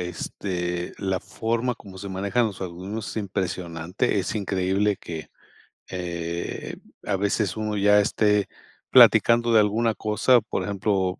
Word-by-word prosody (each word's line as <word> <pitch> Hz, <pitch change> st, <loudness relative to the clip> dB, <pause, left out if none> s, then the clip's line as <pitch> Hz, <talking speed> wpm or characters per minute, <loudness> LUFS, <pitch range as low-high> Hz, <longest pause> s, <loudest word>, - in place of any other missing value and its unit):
este, 90 Hz, 0 st, -4 dB
la 95 Hz, -2 st, -1 dB
forma 115 Hz, +5 st, -2 dB
como 95 Hz, -4 st, -13 dB
se 100 Hz, +1 st, -6 dB
manejan 100 Hz, +5 st, 0 dB
los 100 Hz, -3 st, -6 dB
algoritmos 95 Hz, +5 st, -5 dB
es -, -, -9 dB
impresionante. 95 Hz, 0 st, -2 dB
Es 95 Hz, -, -3 dB
increíble 100 Hz, +1 st, 0 dB
que, 80 Hz, -3 st, -7 dB, 0.6 s
eh, 85 Hz, -1 st, -4 dB, 0.3 s
a 95 Hz, -, 0 dB
veces 100 Hz, +1 st, 0 dB
uno 110 Hz, -1 st, -2 dB
ya 105 Hz, 0 st, +5 dB
esté 105 Hz, 0 st, +2 dB, 0.4 s
platicando 120 Hz, 0 st, +6 dB
de 110 Hz, -, +7 dB
alguna 110 Hz, +2 st, +2 dB
cosa, 110 Hz, +4 st, +3 dB
por 110 Hz, -, -4 dB
ejemplo, 95 Hz, -2 st, -1 dB
100 Hz, 135 wpm, -24 LUFS, 90-105 Hz, 0.6 s, de